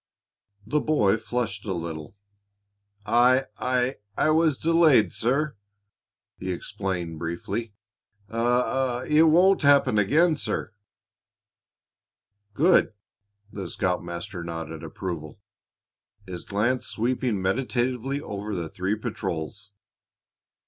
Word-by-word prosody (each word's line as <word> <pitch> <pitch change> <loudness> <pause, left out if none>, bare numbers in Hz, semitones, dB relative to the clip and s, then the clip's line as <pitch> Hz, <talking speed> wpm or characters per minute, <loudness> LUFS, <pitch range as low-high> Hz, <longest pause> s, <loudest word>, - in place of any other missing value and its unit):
The 150 +8 +1
boy 110 -10 +2
flushed 115 -3 -3
a 95 - -1
little. 80 0 -6 0.9
"I 125 +4 +4 0.2
I 125 -2 0
was 160 -3 +3
delayed, 160 -8 +4
sir," 135 +5 0 0.8
he 95 0 -3
explained 90 -3 -4
briefly. 100 +6 -4 0.5
"I 115 +3 -5
I 125 +1 +1
it 155 +2 +5
won't 180 +5 +5
happen 140 -6 +4
again, 155 - +3
sir." 110 - -3 1.8
"Good!" 170 -5 +4 0.6
The 95 -4 -6
scoutmaster 90 +1 -3
nodded 80 -1 -6
approval, 85 -1 -6 0.9
his 90 -2 -7
glance 115 +6 0
sweeping 120 -2 -1
meditatively 125 +6 -1
over 105 -2 -5
the 85 -3 -3
three 95 +5 -1
patrols. 100 0 -5
110 Hz, 95 wpm, -25 LUFS, 95-130 Hz, 1.8 s, it